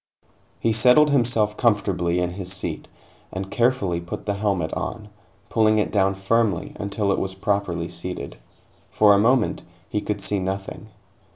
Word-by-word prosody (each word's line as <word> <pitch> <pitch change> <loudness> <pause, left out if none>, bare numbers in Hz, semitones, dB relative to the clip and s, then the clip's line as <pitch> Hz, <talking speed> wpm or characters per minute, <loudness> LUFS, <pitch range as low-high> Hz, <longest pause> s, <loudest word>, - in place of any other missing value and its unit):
He 115 - +1
settled 125 +7 +5
himself 115 -5 +1
comfortably 95 -6 +1
in 90 0 -1
his 95 0 -5
seat, 95 -1 -4 0.4
and 95 +1 -5
carefully 115 -8 +1
put 85 - -7
the 100 - 0
helmet 100 -5 -1
on, 105 -2 -5 0.4
pulling 110 -1 +3
it 105 - 0
down 95 -2 +2
firmly 100 -1 0
until 100 0 -1
it - - +1
was 95 0 -3
properly 95 -4 -1
seated. 90 -2 -6 0.5
For 105 -1 +5
a 100 - +4
moment, 120 +2 +2 0.3
he 105 - -2
could 105 -1 -3
see 100 0 0
nothing. 95 +3 -5
100 Hz, 155 wpm, -23 LUFS, 95-110 Hz, 0.5 s, settled